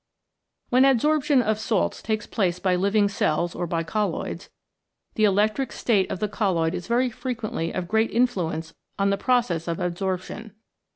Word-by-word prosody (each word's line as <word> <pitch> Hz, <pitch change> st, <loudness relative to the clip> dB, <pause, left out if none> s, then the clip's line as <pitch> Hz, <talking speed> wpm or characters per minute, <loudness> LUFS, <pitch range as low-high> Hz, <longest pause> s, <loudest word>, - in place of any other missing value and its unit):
When 250 Hz, +1 st, +4 dB
adsorption 275 Hz, +1 st, +3 dB
of 215 Hz, -1 st, 0 dB
salts 220 Hz, -3 st, 0 dB
takes 215 Hz, -1 st, -2 dB
place 180 Hz, -5 st, 0 dB
by 180 Hz, 0 st, +1 dB
living 200 Hz, +3 st, +2 dB
cells 170 Hz, -3 st, 0 dB
or 175 Hz, -, -3 dB
by 165 Hz, 0 st, -1 dB
colloids, 210 Hz, +5 st, -3 dB, 0.6 s
the 215 Hz, -, +3 dB
electric 210 Hz, +6 st, +1 dB
state 205 Hz, -6 st, +1 dB
of -, -, -3 dB
the 210 Hz, -, 0 dB
colloid 185 Hz, -6 st, 0 dB
is 180 Hz, -1 st, -5 dB
very 245 Hz, +2 st, +1 dB
frequently 220 Hz, -9 st, -3 dB
of 185 Hz, -2 st, -3 dB
great 220 Hz, +4 st, +2 dB
influence 175 Hz, -9 st, -1 dB, 0.2 s
on 200 Hz, 0 st, +2 dB
the -, -, +2 dB
process 220 Hz, -8 st, +1 dB
of 165 Hz, -1 st, -1 dB
adsorption. 190 Hz, +4 st, -3 dB
205 Hz, 160 wpm, -24 LUFS, 180-230 Hz, 0.6 s, When